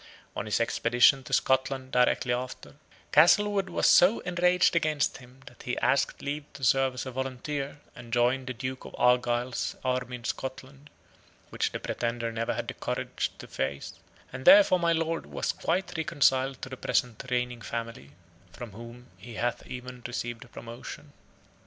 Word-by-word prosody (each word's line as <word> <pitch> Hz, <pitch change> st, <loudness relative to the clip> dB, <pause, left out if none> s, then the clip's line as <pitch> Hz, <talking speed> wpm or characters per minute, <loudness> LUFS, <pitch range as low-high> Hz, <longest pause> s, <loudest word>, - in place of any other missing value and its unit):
On 105 Hz, -, -4 dB
his 105 Hz, -, +1 dB
expedition 120 Hz, +3 st, +3 dB
to -, -, -10 dB
Scotland 130 Hz, 0 st, +1 dB
directly 125 Hz, 0 st, +2 dB
after, 125 Hz, +1 st, -5 dB, 0.4 s
Castlewood 195 Hz, +5 st, +5 dB
was 175 Hz, -, 0 dB
so 185 Hz, +6 st, +6 dB
enraged 180 Hz, 0 st, +2 dB
against 155 Hz, -3 st, +1 dB
him 125 Hz, +1 st, -16 dB
that 130 Hz, -3 st, -14 dB
he 125 Hz, -, -3 dB
asked 140 Hz, -, +1 dB
leave 145 Hz, +1 st, -3 dB
to 140 Hz, -, -11 dB
serve 135 Hz, +1 st, +3 dB
as 125 Hz, -, -4 dB
a 130 Hz, -, -5 dB
volunteer, 135 Hz, +3 st, -4 dB, 0.2 s
and 120 Hz, -1 st, -11 dB
join 125 Hz, +2 st, +2 dB
the 130 Hz, -, -4 dB
Duke 130 Hz, +3 st, -5 dB
of -, -, -10 dB
Argyle's 125 Hz, 0 st, +1 dB
army 125 Hz, -1 st, -1 dB
in 120 Hz, -, -10 dB
Scotland, 135 Hz, +3 st, -6 dB, 0.6 s
which -, -, -1 dB
the -, -, -4 dB
Pretender 115 Hz, -1 st, -2 dB
never 115 Hz, +1 st, -2 dB
had -, -, -4 dB
the -, -, -4 dB
courage -, -, -3 dB
to -, -, -10 dB
face; 70 Hz, +1 st, -4 dB, 0.4 s
and 130 Hz, +1 st, -7 dB
thenceforth 195 Hz, -3 st, +7 dB
my 170 Hz, 0 st, +3 dB
Lord 165 Hz, 0 st, -1 dB
was -, -, -2 dB
quite 175 Hz, +1 st, -2 dB
reconciled 135 Hz, -4 st, +1 dB
to -, -, -5 dB
the 130 Hz, -, -7 dB
present 125 Hz, -3 st, -1 dB
reigning 125 Hz, -1 st, -1 dB
family, 115 Hz, -11 st, -6 dB, 0.4 s
from 120 Hz, -3 st, -8 dB
whom 120 Hz, +4 st, -11 dB
he 120 Hz, -1 st, -10 dB
hath 120 Hz, +1 st, -2 dB
even 125 Hz, 0 st, -8 dB
received 120 Hz, 0 st, -5 dB
promotion. 130 Hz, +5 st, -9 dB
130 Hz, 165 wpm, -28 LUFS, 120-145 Hz, 0.6 s, thenceforth